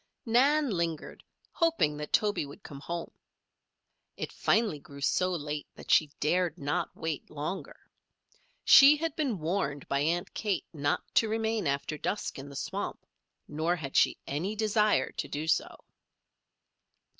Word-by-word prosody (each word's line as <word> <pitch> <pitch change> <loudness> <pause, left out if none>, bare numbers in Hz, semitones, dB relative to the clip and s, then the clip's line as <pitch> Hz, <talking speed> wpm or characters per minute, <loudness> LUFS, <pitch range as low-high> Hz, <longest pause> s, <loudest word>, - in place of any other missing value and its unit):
Nan 270 +4 +3
lingered, 170 -4 -3 0.3
hoping 330 - +2
that 150 0 -6
Toby 210 -5 +2
would 145 0 -11
come 140 - -9
home. 170 +3 -5 1.1
It - - -4
finally 220 -10 +1
grew 140 0 -13
so 180 +6 +2
late 150 -3 -4
that - - -6
she 155 - +5
dared 175 +1 +1
not 145 -2 -2
wait 160 -3 -4
longer. 155 +6 -5 0.9
She 280 +2 +9
had 325 0 -2
been 275 -10 -1
warned 155 -4 -2
by 140 - 0
Aunt 170 +4 -1
Kate 205 -3 -1
not 145 -2 0
to 225 - +3
remain 220 -2 0
after 140 +2 -2
dusk 205 - -3
in 140 +1 -8
the 140 - -11
swamp, - - -4 0.4
nor 160 +4 0
had 140 -5 -7
she - - +4
any 175 +10 -2
desire 215 - +2
to - - -4
do 150 +2 -4
so. 160 - 0
170 Hz, 145 wpm, -29 LUFS, 145-215 Hz, 1.1 s, She